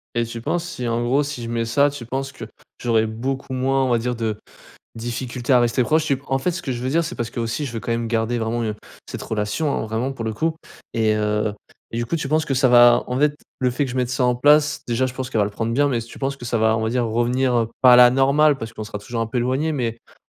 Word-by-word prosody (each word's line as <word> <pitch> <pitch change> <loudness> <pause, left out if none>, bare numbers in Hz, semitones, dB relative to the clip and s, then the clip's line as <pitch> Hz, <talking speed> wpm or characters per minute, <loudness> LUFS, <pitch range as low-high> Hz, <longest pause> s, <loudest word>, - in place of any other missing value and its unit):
Et 120 - +2
tu 115 0 -7
penses 175 +7 -2
si, 125 -8 -5
en 115 +1 0
gros, 130 +4 +2
si 145 -4 -5
je 115 - -5
mets 115 0 -1
ça, 140 +5 +3
tu 140 -4 -7
penses 135 +3 -4
que - - -8 0.4
j'aurais 115 -2 +2
beaucoup 130 +4 -4
moins, 135 +1 +1
on - - 0
va 120 -1 +2
dire, 125 +2 -2
de 110 -2 -2 0.6
difficultés 120 +2 -3
à 125 - +6
rester 120 +1 +2
proche? 155 +5 +2
Tu 140 -3 +1
p - - -21
en 135 - 0
fait, 135 - 0
ce 170 0 -4
que 145 - -5
je 120 0 -5
veux 130 - -1
dire 165 +4 +2
c'est 165 - -5
parce 120 -1 -4
qu'aussi 115 +5 -3
je 130 - -5
veux 115 - -4
quand 115 - -2
même 115 0 -2
garder 115 +1 0
vraiment, 115 +1 -1
heu, 110 -1 -2 0.3
cette - - -6
relation, 110 +7 -1
hein, - - -2
vraiment 115 +5 -2
pour 120 -4 -6
le 110 - -2
coup, 160 +8 0 0.4
et 110 -1 +2
heu, 105 0 0 0.4
et - - -4
du 120 - 0
coup 125 +8 -2
tu 150 -4 -3
penses 155 +2 +2
que 145 - -3
ça 130 0 +3
va 120 0 +6
en 125 - -2
fait 145 +1 +2 0.2
le 125 -1 +2
fait 135 +4 -1
que - - -6
je 125 - -5
mette 125 -1 0
ça 125 0 0
en 125 0 +3
place 150 +4 +3
déjà 120 +2 +1
je 125 - -6
pense 130 0 -5
qu'elle 115 - -1
va 105 - +4
le - - -5
prendre 115 +3 -3
bien, 145 +4 +3
mais 125 -4 0
s 115 - -6
tu - - -12
penses 140 0 -2
que 125 - -10
ça 120 -1 -1
va, 110 0 +3
on 110 - -1
va 110 - 0
dire, 120 0 0
revenir, 120 +3 +1
heu, 115 -1 +1
pas 125 -1 +8
à - - +8
la 125 0 +8
normale 140 +3 +3
parce 115 -2 -6
qu'on 110 - -6
sera 105 -1 -6
toujours 115 +3 -5
un - - -2
peu 115 +3 -2
éloignés, 130 +6 0
mais 120 -5 -2
on - - -23
120 Hz, 305 wpm, -22 LUFS, 115-135 Hz, 0.6 s, pas